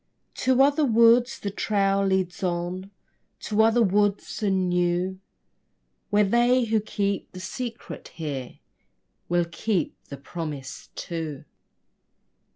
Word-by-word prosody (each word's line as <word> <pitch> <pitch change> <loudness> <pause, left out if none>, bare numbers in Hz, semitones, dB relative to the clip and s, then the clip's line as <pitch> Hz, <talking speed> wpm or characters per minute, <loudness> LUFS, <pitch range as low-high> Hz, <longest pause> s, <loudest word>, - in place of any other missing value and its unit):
To 260 +1 +4
other 290 +2 +3
woods 235 0 +5
the 200 - -4
trail 200 -1 +1
leads 190 -2 0
on, 180 +1 -2 0.5
To 215 0 +1
other 225 +2 +4
worlds 205 +1 0
and 190 -3 +1
new, 180 +1 0 0.9
Where 210 0 +4
they 240 +5 +3
who 220 -1 +1
keep 200 -2 -2
the 185 - -8
secret 235 +6 -6
here 140 -6 -6 0.7
Will 175 0 +2
keep 175 +1 -2
the 140 - -8
promise 145 -3 -7
too. 160 -5 -5
195 Hz, 115 wpm, -25 LUFS, 175-220 Hz, 0.9 s, woods